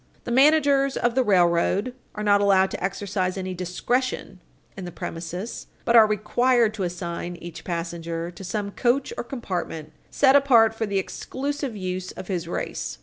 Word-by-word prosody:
The 240 Hz, -, -5 dB
managers 275 Hz, 0 st, +4 dB
of 240 Hz, 0 st, +1 dB
the 260 Hz, +1 st, +2 dB
railroad 185 Hz, +3 st, +2 dB, 0.2 s
are 210 Hz, -, -4 dB
not 205 Hz, -1 st, +4 dB
allowed 190 Hz, -1 st, +4 dB
to -, -, -5 dB
exercise 190 Hz, -1 st, -2 dB
any 185 Hz, -1 st, -3 dB
discretion 190 Hz, +4 st, -2 dB, 0.4 s
in 190 Hz, -, -7 dB
the 175 Hz, -, -6 dB
premises, 175 Hz, +7 st, -6 dB, 0.2 s
but 235 Hz, -, +3 dB
are 220 Hz, -2 st, +8 dB
required 230 Hz, +2 st, +2 dB
to 215 Hz, -, -6 dB
assign 175 Hz, -1 st, -4 dB
each 170 Hz, -1 st, -9 dB
passenger 170 Hz, -1 st, -4 dB
to 180 Hz, +2 st, -11 dB
some 200 Hz, +2 st, -3 dB
coach 250 Hz, +5 st, 0 dB
or -, -, -4 dB
compartment 180 Hz, -, -5 dB, 0.2 s
set 270 Hz, -1 st, +4 dB
apart 240 Hz, -6 st, +5 dB
for 225 Hz, -1 st, -3 dB
the 200 Hz, -1 st, -1 dB
exclusive 275 Hz, +6 st, -3 dB
use 185 Hz, -1 st, -4 dB
of 185 Hz, +1 st, -9 dB
his 175 Hz, -3 st, -2 dB
race. -, -, -4 dB
200 Hz, 165 wpm, -24 LUFS, 175-240 Hz, 0.4 s, are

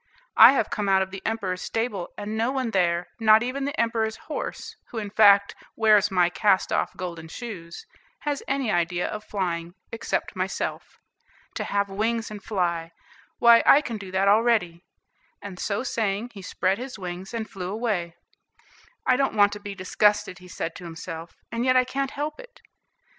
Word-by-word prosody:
I 235 Hz, +4 st, +10 dB
have 225 Hz, -6 st, 0 dB
come 205 Hz, -2 st, -1 dB
out 190 Hz, 0 st, +4 dB
of 190 Hz, -, -9 dB
the 195 Hz, 0 st, -7 dB
Emperor's 195 Hz, -5 st, -2 dB
stable, 225 Hz, -6 st, -3 dB
and 210 Hz, +1 st, -4 dB
no 230 Hz, +3 st, +1 dB
one 260 Hz, -4 st, -2 dB
there, 175 Hz, -2 st, +1 dB
not 220 Hz, 0 st, +6 dB
even 270 Hz, +3 st, -3 dB
the 285 Hz, +2 st, -4 dB
Emperor's 225 Hz, -1 st, 0 dB
horse, 305 Hz, -, -6 dB
who, 235 Hz, -, -8 dB
in 205 Hz, -2 st, -4 dB
fact, 200 Hz, -2 st, +6 dB, 0.2 s
wears 210 Hz, -2 st, +4 dB
my 180 Hz, -3 st, +3 dB
cast 190 Hz, +1 st, +2 dB
off -, -, -1 dB
golden 170 Hz, -3 st, -6 dB
shoes, 185 Hz, -, -8 dB, 0.4 s
has 290 Hz, -1 st, -2 dB
any 270 Hz, -4 st, 0 dB
idea 175 Hz, +1 st, 0 dB
of 215 Hz, 0 st, -6 dB
flying, 175 Hz, -4 st, -3 dB, 0.2 s
excepting 230 Hz, -, -2 dB
myself. -, -, -3 dB, 0.6 s
To -, -, -3 dB
have 200 Hz, 0 st, 0 dB
wings 225 Hz, +3 st, -2 dB
and 205 Hz, -2 st, -8 dB
fly! 170 Hz, -5 st, -2 dB, 0.4 s
why, 235 Hz, 0 st, +7 dB
I 280 Hz, -, +7 dB
can 230 Hz, -7 st, -5 dB
do 195 Hz, -2 st, -8 dB
that 190 Hz, +1 st, +1 dB
already;" 205 Hz, -5 st, +3 dB, 0.6 s
and 190 Hz, -3 st, -9 dB
so 205 Hz, +3 st, -1 dB
saying, 220 Hz, -1 st, -2 dB
he 200 Hz, -, -9 dB
spread 190 Hz, +2 st, -1 dB
his 255 Hz, -1 st, -7 dB
wings 180 Hz, 0 st, -6 dB
and 230 Hz, -2 st, -4 dB
flew 185 Hz, -2 st, -6 dB
away. 200 Hz, -7 st, -2 dB, 0.9 s
"I 255 Hz, -, +4 dB
don't 270 Hz, -4 st, 0 dB
want 205 Hz, -1 st, +4 dB
to 205 Hz, -, -6 dB
be 205 Hz, -1 st, -7 dB
disgusted," 205 Hz, 0 st, +1 dB
he 180 Hz, -, -14 dB
said 170 Hz, -1 st, -5 dB
to -, -, -11 dB
himself, 165 Hz, 0 st, -8 dB, 0.2 s
"and 230 Hz, +1 st, -2 dB
yet 255 Hz, 0 st, +3 dB
I 255 Hz, -, +5 dB
can't 270 Hz, +2 st, -2 dB
help 300 Hz, +2 st, -4 dB
it." -, -, -13 dB
205 Hz, 180 wpm, -25 LUFS, 185-230 Hz, 0.9 s, I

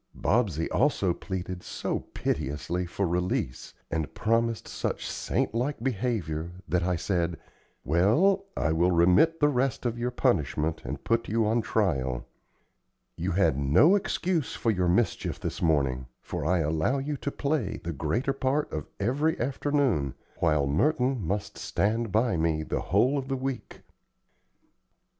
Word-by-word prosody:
Bobsey 95 Hz, -8 st, +1 dB
also 110 Hz, -10 st, +2 dB
pleaded 90 Hz, -1 st, -5 dB
so -, -, -3 dB
piteously 85 Hz, +6 st, -3 dB
for 100 Hz, +3 st, -1 dB
release, 90 Hz, -7 st, -2 dB, 0.2 s
and 80 Hz, -2 st, -2 dB
promised 115 Hz, 0 st, +1 dB
such -, -, -3 dB
saint -, -, -1 dB
like 125 Hz, +2 st, -2 dB
behavior, 95 Hz, -, -2 dB
that 85 Hz, +3 st, +1 dB
I 90 Hz, +1 st, +1 dB
said: 85 Hz, -1 st, -1 dB, 0.5 s
"Well, 110 Hz, -, +3 dB
I 75 Hz, -, +1 dB
will 85 Hz, +3 st, +3 dB
remit 90 Hz, -, +4 dB
the 145 Hz, -, +5 dB
rest 130 Hz, -1 st, 0 dB
of 120 Hz, -1 st, -1 dB
your 120 Hz, +1 st, 0 dB
punishment 80 Hz, -, 0 dB
and -, -, -5 dB
put 115 Hz, 0 st, 0 dB
you 110 Hz, +1 st, +2 dB
on 115 Hz, +2 st, +2 dB
trial. 65 Hz, -, 0 dB, 0.9 s
You 90 Hz, +2 st, -2 dB
had 90 Hz, -7 st, +2 dB
no 80 Hz, -, +5 dB
excuse 180 Hz, -5 st, -1 dB
for 115 Hz, -, +1 dB
your 90 Hz, -3 st, +1 dB
mischief 105 Hz, +6 st, 0 dB
this -, -, -4 dB
morning, 70 Hz, -6 st, +1 dB
for 75 Hz, -, -4 dB
I 90 Hz, -1 st, +3 dB
allow 80 Hz, -, +1 dB
you 145 Hz, +2 st, -2 dB
to 140 Hz, -, -3 dB
play 140 Hz, -7 st, -1 dB
the 85 Hz, -, -3 dB
greater 100 Hz, -, -1 dB
part 135 Hz, +2 st, -1 dB
of 75 Hz, -2 st, -4 dB
every 145 Hz, +10 st, +1 dB
afternoon, 130 Hz, -, 0 dB, 0.2 s
while 75 Hz, -4 st, +2 dB
Merton 125 Hz, -, +1 dB
must 100 Hz, +2 st, -3 dB
stand 115 Hz, +1 st, 0 dB
by 110 Hz, -1 st, +2 dB
me 80 Hz, -1 st, +1 dB
the -, -, -2 dB
whole 125 Hz, +10 st, +2 dB
of 135 Hz, -, -6 dB
the 135 Hz, 0 st, -1 dB
week." 130 Hz, -1 st, -5 dB
100 Hz, 150 wpm, -28 LUFS, 80-130 Hz, 0.9 s, the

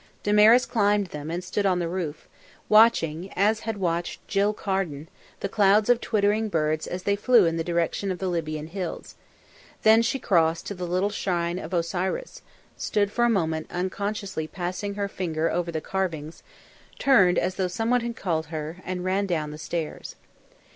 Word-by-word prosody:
Damaris 210 Hz, +4 st, +6 dB
climbed 205 Hz, -3 st, +1 dB
them, 150 Hz, +1 st, -6 dB
and 175 Hz, +2 st, -3 dB
stood 200 Hz, +2 st, -1 dB
on 185 Hz, -2 st, +2 dB
the 175 Hz, -1 st, -1 dB
roof, 165 Hz, -4 st, -4 dB, 0.4 s
watching, 195 Hz, -6 st, +4 dB
as 215 Hz, +3 st, +2 dB
had 225 Hz, -1 st, -4 dB
watched 175 Hz, -2 st, -2 dB
Jill 200 Hz, +1 st, +2 dB
Carden, 190 Hz, -8 st, -3 dB, 0.3 s
the -, -, -1 dB
clouds 205 Hz, +3 st, +4 dB
of 240 Hz, -1 st, +2 dB
twittering 215 Hz, +1 st, +1 dB
birds 155 Hz, -3 st, 0 dB
as 180 Hz, +1 st, -5 dB
they 200 Hz, +1 st, +2 dB
flew 230 Hz, 0 st, +4 dB
in 165 Hz, 0 st, 0 dB
the 165 Hz, -, -1 dB
direction 170 Hz, +3 st, -1 dB
of 185 Hz, -, -2 dB
the 190 Hz, -, -3 dB
Libyan 155 Hz, -3 st, -3 dB
Hills; 180 Hz, +1 st, -6 dB, 0.7 s
then 220 Hz, +1 st, +6 dB
she 230 Hz, +4 st, 0 dB
crossed 170 Hz, -9 st, +1 dB
to -, -, -4 dB
the 180 Hz, -2 st, -5 dB
little 185 Hz, +4 st, 0 dB
shrine 175 Hz, -3 st, -1 dB
of -, -, -8 dB
Osiris, 185 Hz, -, -2 dB, 0.3 s
stood 205 Hz, -1 st, 0 dB
for 240 Hz, +2 st, +2 dB
a -, -, +3 dB
moment 160 Hz, -7 st, 0 dB
unconsciously 190 Hz, -1 st, -3 dB
passing 185 Hz, +4 st, -4 dB
her 200 Hz, -1 st, -1 dB
finger 165 Hz, -4 st, -2 dB
over 175 Hz, -1 st, -1 dB
the 160 Hz, -, -2 dB
carvings, 165 Hz, -4 st, -3 dB, 0.6 s
turned 195 Hz, -10 st, +4 dB
as 185 Hz, -, +1 dB
though 185 Hz, -1 st, -1 dB
someone 225 Hz, +7 st, 0 dB
had 235 Hz, 0 st, -4 dB
called 160 Hz, -6 st, -2 dB
her, 155 Hz, +1 st, -5 dB
and 180 Hz, 0 st, -4 dB
ran 195 Hz, +2 st, 0 dB
down 155 Hz, -4 st, -2 dB
the 150 Hz, -, -9 dB
stairs. 160 Hz, 0 st, -5 dB
185 Hz, 175 wpm, -25 LUFS, 165-205 Hz, 0.7 s, Damaris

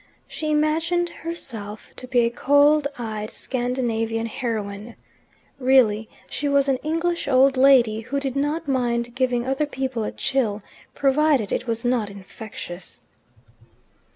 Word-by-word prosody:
She 310 Hz, -, -4 dB
imagined 325 Hz, +3 st, +1 dB
herself 230 Hz, -13 st, -6 dB
to 255 Hz, -, -7 dB
be 250 Hz, -1 st, +3 dB
a 235 Hz, 0 st, +1 dB
cold 285 Hz, +3 st, +4 dB
eyed 215 Hz, -3 st, -4 dB
Scandinavian 235 Hz, -3 st, -2 dB
heroine. 220 Hz, -2 st, -4 dB, 0.6 s
Really 240 Hz, -5 st, +3 dB, 0.2 s
she 290 Hz, -, -2 dB
was 280 Hz, 0 st, +3 dB
an 270 Hz, -1 st, +2 dB
English 330 Hz, +3 st, -1 dB
old 270 Hz, 0 st, +5 dB
lady, 255 Hz, -5 st, +5 dB
who 260 Hz, +5 st, -3 dB
did 270 Hz, -2 st, -3 dB
not 290 Hz, +3 st, -1 dB
mind 240 Hz, -3 st, 0 dB
giving 250 Hz, -2 st, 0 dB
other 270 Hz, +3 st, 0 dB
people 260 Hz, -4 st, -3 dB
a -, -, -3 dB
chill 220 Hz, -6 st, -1 dB, 0.3 s
provided 280 Hz, -5 st, +2 dB
it -, -, -2 dB
was 230 Hz, +1 st, -2 dB
not 240 Hz, -4 st, +1 dB
infectious. 195 Hz, -2 st, -9 dB
255 Hz, 130 wpm, -23 LUFS, 225-280 Hz, 0.6 s, old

